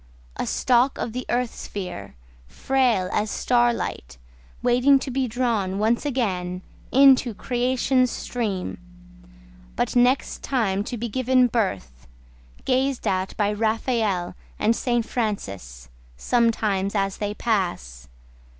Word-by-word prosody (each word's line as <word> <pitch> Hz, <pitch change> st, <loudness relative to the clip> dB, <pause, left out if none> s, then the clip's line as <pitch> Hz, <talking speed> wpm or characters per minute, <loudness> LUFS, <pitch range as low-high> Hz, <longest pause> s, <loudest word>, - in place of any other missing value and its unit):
A -, -, -3 dB
stalk 250 Hz, +2 st, +2 dB
of 225 Hz, -, -4 dB
the 255 Hz, +1 st, -5 dB
earth 245 Hz, -1 st, 0 dB
sphere, 180 Hz, -, -7 dB, 0.3 s
Frail 230 Hz, -, +1 dB
as 210 Hz, +1 st, 0 dB
star 240 Hz, +1 st, +2 dB
light; 65 Hz, -, -5 dB, 0.5 s
Waiting 250 Hz, +3 st, +5 dB
to 265 Hz, 0 st, -4 dB
be 260 Hz, 0 st, 0 dB
drawn 220 Hz, -5 st, -1 dB
once 225 Hz, +7 st, +1 dB
again 185 Hz, -9 st, -2 dB, 0.3 s
Into 265 Hz, -4 st, +5 dB
creation's 255 Hz, +2 st, +1 dB
stream. 215 Hz, -7 st, -4 dB, 1.0 s
But -, -, -1 dB
next 250 Hz, +2 st, +2 dB
time 205 Hz, -7 st, 0 dB
to 245 Hz, -, -4 dB
be 235 Hz, +2 st, -3 dB
given 255 Hz, +2 st, +2 dB
birth 95 Hz, -, -2 dB, 0.6 s
Gazed 265 Hz, 0 st, 0 dB
at 185 Hz, 0 st, -1 dB
by 205 Hz, 0 st, +1 dB
Raphael 220 Hz, -4 st, 0 dB, 0.2 s
and 225 Hz, +2 st, +2 dB
St. 240 Hz, -2 st, 0 dB
Francis 100 Hz, -, -4 dB, 0.3 s
Sometimes 215 Hz, -, +1 dB
as 195 Hz, -1 st, 0 dB
they 205 Hz, 0 st, -3 dB
pass. 175 Hz, -, -2 dB
225 Hz, 120 wpm, -24 LUFS, 190-250 Hz, 1.0 s, Waiting